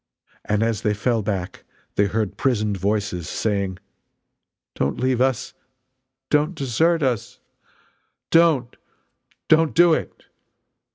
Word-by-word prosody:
And 105 +1 0
as 115 -2 -1
they 105 -2 0
fell 115 +1 0
back 95 -3 -4 0.3
they 100 - +2
heard 105 0 -2
prisoned 110 -6 0
voices 100 -3 -2
saying: 100 -4 -1 1.0
"Don't 70 - -2
leave 130 -1 +1
us! 130 -2 0 0.8
Don't 150 +4 +2
desert 160 +4 +1
us! 125 -5 -2 0.9
Don't, 165 -7 +3 0.7
don't 160 0 +3
do 175 -1 +6
it!" - - -4
115 Hz, 110 wpm, -22 LUFS, 100-145 Hz, 1.0 s, do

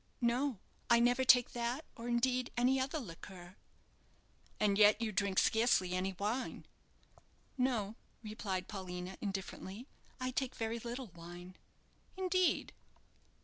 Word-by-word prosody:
"No; 245 +1 +1 0.3
I 235 0 +7
never 245 +2 +3
take 250 -2 +6
that, 240 +5 -2
or 230 - -7
indeed, 250 +1 +1
any 255 +2 +3
other 270 +4 -1
liqueur." 180 - -10 1.0
"And 205 -1 +3
yet 210 +1 +7
you 225 -2 -1
drink 195 -1 0
scarcely 220 -5 +3
any 185 +1 -1
wine?" 220 +6 -2 0.9
"No," 245 -6 0 0.3
replied 200 -4 -3
Paulina, 185 -2 -6
indifferently; 195 +2 -5 0.3
"I 255 0 -1
take 260 0 -2
very 225 +1 -2
little 240 +1 -5
wine." 175 +2 -10 0.6
"Indeed!" 370 -1 +1
230 Hz, 120 wpm, -35 LUFS, 190-250 Hz, 1.0 s, I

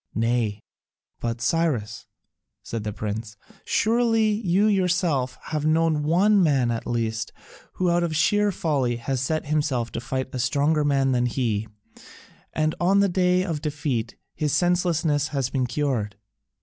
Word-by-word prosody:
"Nay, 115 -2 0 0.6
but, 115 0 -3
Cyrus," 130 -5 -1 0.6
said 115 -2 -5
the 105 - -3
prince, 105 +1 -5 0.3
"surely 225 -1 +2
you 205 -2 +1
yourself 180 -10 +1
have 155 -2 -1
known 160 -1 +2
one 190 +7 +3
man 135 -8 +2
at 115 - -4
least 115 -1 -2 0.4
who 180 -1 +1
out 175 0 +2
of 170 -2 -1
sheer 205 +6 +3
folly 140 -9 0
has 125 +2 -3
set 155 +4 -1
himself 145 -6 -1
to 115 - -4
fight 130 +2 -4
a 130 - -3
stronger 145 +5 +1
man 135 -2 +2
than 125 -1 +2
he, 115 -4 -1 0.8
and 155 0 0
on 190 +3 +3
the 200 0 +3
day 180 0 +2
of 160 -5 -3
defeat 145 -7 -2 0.2
his 150 -2 -1
senselessness 170 -3 +1
has 135 -4 -2
been 130 -2 0
cured. 120 -6 -1
145 Hz, 150 wpm, -24 LUFS, 120-175 Hz, 0.8 s, one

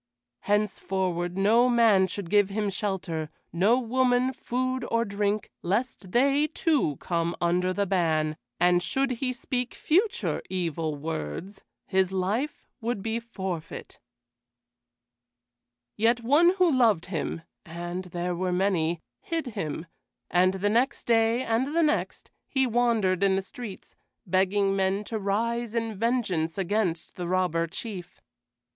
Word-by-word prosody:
Henceforward 190 -4 -1
no 225 +6 +4
man 225 -6 +5
should 185 -1 -5
give 205 -2 +4
him 205 0 -1
shelter, 185 -6 -3 0.2
no 200 +8 +4
woman 255 +1 +2
food 255 +1 -2
or 230 0 +1
drink, 205 0 -1
lest 205 +1 -2
they 280 +6 +3
too 310 - +1
come 170 +3 -1
under 180 +2 +1
the 200 +2 0
ban; 160 -5 +1 0.2
and 175 0 +4
should 265 +9 0
he 260 -2 +1
speak 250 0 -3
future 315 - +1
evil 165 -4 -2
words, 155 - -5 0.2
his 190 -1 +1
life 205 +10 -2
would 225 -3 -2
be 225 +1 -1
forfeit. 190 -8 -6 2.0
Yet 235 +2 +2
one 315 +9 +4
who 365 -3 +4
loved 230 - +3
him 165 -2 -3 0.2
and 175 +2 -5
there 175 0 -3
were 180 +1 -1
many 175 -3 +1 0.2
hid 330 -2 -3
him; 160 -1 -4 0.5
and 185 +2 +3
the 200 +2 0
next 240 +6 +1
day 230 +1 +3
and 260 +7 0
the 335 - +4
next 300 -1 -1 0.2
he 265 -1 +2
wandered 225 -6 +2
in 195 -1 +4
the 195 - -1
streets, 215 0 -9 0.3
begging 195 +2 +2
men 195 +1 +1
to 220 +1 -4
rise 230 +3 -1
in 225 -1 -1
vengeance 200 -7 0
against 190 -3 -1
the 175 -1 -3
Robber 175 -2 +1
Chief. 180 0 -7
200 Hz, 135 wpm, -27 LUFS, 180-235 Hz, 2.0 s, man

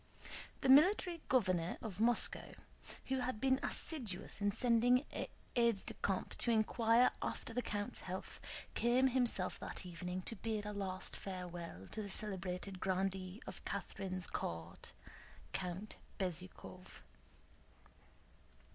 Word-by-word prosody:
The 265 - +2
Military 340 +4 +6
Governor 185 -9 +2
of 205 -4 -6
Moscow, 230 +1 +2 0.5
who 265 0 0
had 250 -3 -1
been 265 +2 +3
assiduous 220 - -1
in 205 0 +3
sending 245 +4 +4 0.5
aides 235 -5 +3
de - - -2
camp 195 -2 -1
to - - +2
inquire 230 +2 +5
after 230 - -3
the 245 - +1
count's 205 -3 -2
health, 185 +1 -5 0.3
came 250 +3 +4
himself 240 -7 +1
that - - -4
evening 180 +1 -4
to 230 - -5
bid 215 0 -2
a 210 - -3
last 190 -2 -3
farewell 175 - -6
to 220 - -3
the 200 - -5
celebrated 190 -1 -3
grandee 190 +2 -1
of - - -8
Catherine's 185 -2 -2
court, 85 0 -4 0.6
Count 185 +3 -3 0.2
Bezúkhov. 185 0 -5
205 Hz, 120 wpm, -38 LUFS, 185-240 Hz, 0.6 s, Military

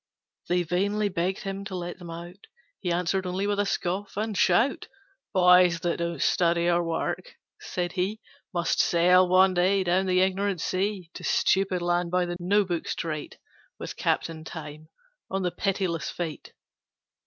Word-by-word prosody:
They 180 0 +2
vainly 200 +5 0
begged 180 +1 -2
him 195 0 -4
to 195 - -5
let 175 0 -5
them 175 -2 -9
out, 175 +3 -9 0.3
He 180 - -2
answered 180 +2 0
only 185 +2 -2
with 205 0 +1
scoff 190 +3 -3
and 215 0 -2
shout. 210 +9 +2 0.4
'Boys 180 -2 +5
that 170 0 -1
don't 170 -2 -2
study 170 -1 +2
or 175 0 +3
work,' 165 - -3 0.2
said 175 -1 -3
he, 190 +4 -2 0.3
'Must 175 -3 0
sail 180 +2 +5
one 185 +1 +5
day 190 +2 +2
down 185 +2 +1
the 185 0 +3
Ignorant 190 0 0
Sea 185 0 -2
To - - -9
Stupid 190 -2 +1
Land 175 0 +1
by 180 0 +1
the 175 0 -4
No 200 +4 +2
Book 175 -3 -3
Strait, 155 -3 -4 0.4
With - - -7
Captain 160 -1 -1
Time 155 -1 -9 0.4
on 195 0 -2
the 180 - 0
Pitiless 180 -2 -1
Fate. 165 -4 -6
180 Hz, 160 wpm, -26 LUFS, 175-195 Hz, 0.4 s, Boys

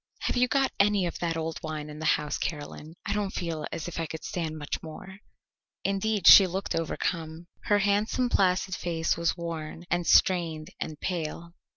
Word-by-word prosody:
"Have - - -1
you 250 0 +3
got 270 0 +2
any 200 -2 +3
of 170 - -4
that 165 -1 -1
old 160 0 -3
wine 155 -1 -5
in 150 0 -9
the 160 - -1
house, 150 -1 -4
Caroline? 155 +1 -5
I 200 - -1
don't 205 -2 -1
feel 165 -3 -3
as 160 - -4
if 175 - -5
I 165 - -2
could 160 +1 -7
stand 160 -3 -3
much 145 -1 -4
more." 190 +4 -10 0.6
Indeed, 200 0 0
she 195 - +10
looked 190 +2 -3
overcome. 165 0 -3 0.2
Her 205 - +4
handsome 205 +5 +1
placid 190 -3 +2
face 165 -2 -1
was 170 +1 0
worn 165 0 -6
and 175 -1 0
strained 165 -4 +3
and 155 -1 -5
pale. 170 -1 -4
170 Hz, 185 wpm, -28 LUFS, 160-195 Hz, 0.6 s, she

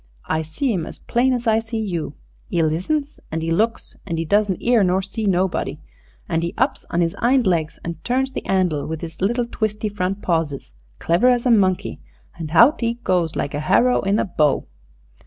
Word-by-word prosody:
I 160 - 0
see 190 - -2
'im 170 -5 -2
as - - -9
plain 250 +2 +1
as 245 -1 -1
I 220 -1 +3
see 225 0 -5
you. 180 -8 -3 0.4
'E 165 - +2
listens 275 - -1
an' 160 0 -3
'e 165 - -1
looks, 220 +7 0
and 165 - -2
'e 165 - -1
doesn't 200 +1 +2
'ear 235 -3 +3
nor 185 +1 +2
see 205 +2 -3
nobody. 180 -5 0 0.5
An' 165 -1 0
'e 170 +1 -3
ups 260 +4 0
on 170 - 0
his 165 -1 0
'ind 250 +1 +3
legs 165 -4 0
and 170 -1 -6
turns 265 +2 0
the - - -5
'andle 180 -6 +1
with 160 +1 -5
'is 165 +1 -8
little 240 +5 +1
twisty 215 -2 -2
front 195 0 -3
pawses, 155 - -1 0.2
clever 170 +9 +2
as 245 -1 +3
a 250 - +4
monkey, 190 -5 +2 0.4
and 165 -3 -6
hout 235 - +5
'e 230 0 0
goes 175 -4 +1
like 140 - -2
a 145 - -2
harrow 245 +11 +3
in 200 +1 +1
a - - +1
bow. 150 -7 +1
190 Hz, 205 wpm, -21 LUFS, 165-230 Hz, 0.5 s, hout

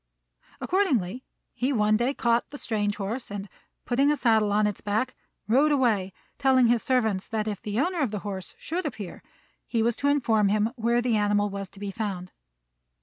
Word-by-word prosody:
Accordingly, 260 - 0 0.3
he 255 +3 -1
one 215 -4 +3
day 245 +5 +1
caught 235 0 +1
the 290 - -8
strange 205 -5 -1
horse 220 +5 -4
and, 200 0 -5 0.4
putting 275 +4 +3
a 300 - +1
saddle 220 -5 +3
on 210 +1 +3
its 210 -2 -2
back, 215 +5 -1 0.3
rode 275 +7 +4
away, 225 -9 +2 0.3
telling 260 -2 +4
his 235 -1 +3
servant 220 -7 +1
that 220 -1 -2
if 205 -3 -3
the 210 +2 -2
owner 350 +4 0
of 270 - +1
the 205 -2 -4
horse 190 -2 -6
should 345 +1 -3
appear, 210 -9 -7 0.5
he 230 -2 +1
was 235 0 +1
to 285 - 0
inform 230 -8 +3
him 210 +2 +1
where 235 0 +1
the 240 -2 +2
animal 205 0 +1
was 195 -1 -5
to 195 - -15
be 200 -1 -4
found. 195 -4 -4
220 Hz, 190 wpm, -26 LUFS, 205-255 Hz, 0.5 s, rode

